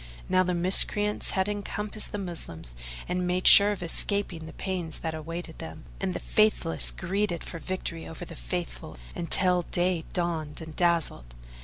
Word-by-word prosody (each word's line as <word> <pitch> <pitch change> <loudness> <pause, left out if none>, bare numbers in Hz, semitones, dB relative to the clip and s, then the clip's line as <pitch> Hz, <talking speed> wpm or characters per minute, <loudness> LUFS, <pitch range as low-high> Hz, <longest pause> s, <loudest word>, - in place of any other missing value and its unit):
Now 185 0 +4
the 180 -1 +1
miscreants 200 +4 +4
had 190 +1 +2
encompassed 210 +1 -3
the - - -3
Moslems 150 - -3 0.3
and 180 0 -1
made 180 +1 0
sure 200 +1 +10
of 205 -3 -3
escaping 175 -1 -1
the - - -10
pains 180 -4 -3
that 160 -1 -2
awaited 160 +1 -6
them; 160 -1 -8
and 190 -2 -2
the - - -2
Faithless 215 -6 +1
greeded 190 -1 -1
for 165 - -7
victory 170 -1 -4
over 165 - -7
the - - -10
Faithful - - -5 0.2
until 180 +1 +2
day 175 -1 -1
dawned 165 -4 -2
and 160 -2 -9
dazzled. 165 - 0
175 Hz, 160 wpm, -28 LUFS, 160-190 Hz, 0.3 s, sure